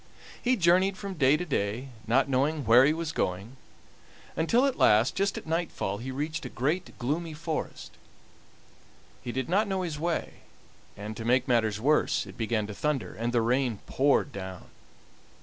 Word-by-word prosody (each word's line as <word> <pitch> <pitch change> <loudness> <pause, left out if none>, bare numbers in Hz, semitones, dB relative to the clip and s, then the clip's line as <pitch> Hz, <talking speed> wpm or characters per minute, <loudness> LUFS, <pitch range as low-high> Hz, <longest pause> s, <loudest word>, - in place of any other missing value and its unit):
He 255 +1 +2
journeyed 185 0 +3
from 200 -1 -5
day 145 -3 +4
to 180 - -4
day, 120 - -2 0.2
not 130 +5 +3
knowing 140 +2 0
where 120 +4 +7
he 145 - +4
was 160 0 -3
going, 100 - -3 0.8
until 230 +11 +3
at 275 - -1
last, 110 +4 +5
just 195 +1 0
at - - -7
nightfall, 160 - -2
he 125 +3 -6
reached 150 +5 -3
a 125 - -5
great, 155 +10 -2
gloomy 155 +6 -2
forest. 160 0 -5 1.3
He 120 - -5
did 130 +2 -3
not 200 +5 +2
know 190 -1 -1
his 160 -4 -4
way, 170 +1 -2 0.6
and, 105 +2 -6
to 115 - -5
make 125 +2 +2
matters 110 -4 +1
worse, 150 +1 +2
it 95 -2 -11
began 110 0 -1
to 105 - -7
thunder, 135 -6 -2
and 115 +2 -2
the 120 -1 +2
rain 120 0 +1
poured 140 +1 +2
down. 95 -4 -8
135 Hz, 170 wpm, -28 LUFS, 115-165 Hz, 1.3 s, where